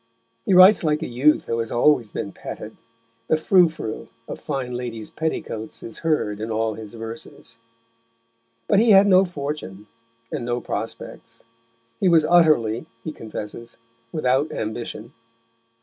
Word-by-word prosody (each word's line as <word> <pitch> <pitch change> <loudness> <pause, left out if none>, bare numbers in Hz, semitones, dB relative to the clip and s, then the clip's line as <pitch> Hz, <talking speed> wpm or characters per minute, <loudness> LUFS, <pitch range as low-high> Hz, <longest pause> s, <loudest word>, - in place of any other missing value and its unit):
He 190 - +4
writes 185 +2 +8
like 155 0 +1
a - - -3
youth 130 +6 +2
who 115 - -2
has 115 -1 -3
always 120 -2 +3
been 100 - -5
petted; - - -8 0.5
the 155 - +3
frou 175 +2 +4
frou 110 -8 -6 0.2
of - - -6
fine 135 -4 -3
ladies' 120 -3 -5
petticoats 115 -8 -4
is 115 - -7
heard 150 -11 0
in 110 +1 -4
all 110 0 -1
his 110 +1 -9
verses. 115 0 -9 1.1
But 200 - +4
he 230 +1 +4
had 195 -1 +8
no 190 -1 +6
fortune 140 - -6 0.5
and - - -3
no 120 0 -1
prospects; 110 -1 -6 0.6
he 190 - +3
was 165 -3 +5
utterly, 150 -10 +3 0.2
he 155 - -4
confesses, 115 -2 -8 0.3
without 140 -1 +1
ambition. 110 +2 -5
125 Hz, 145 wpm, -23 LUFS, 110-160 Hz, 1.1 s, writes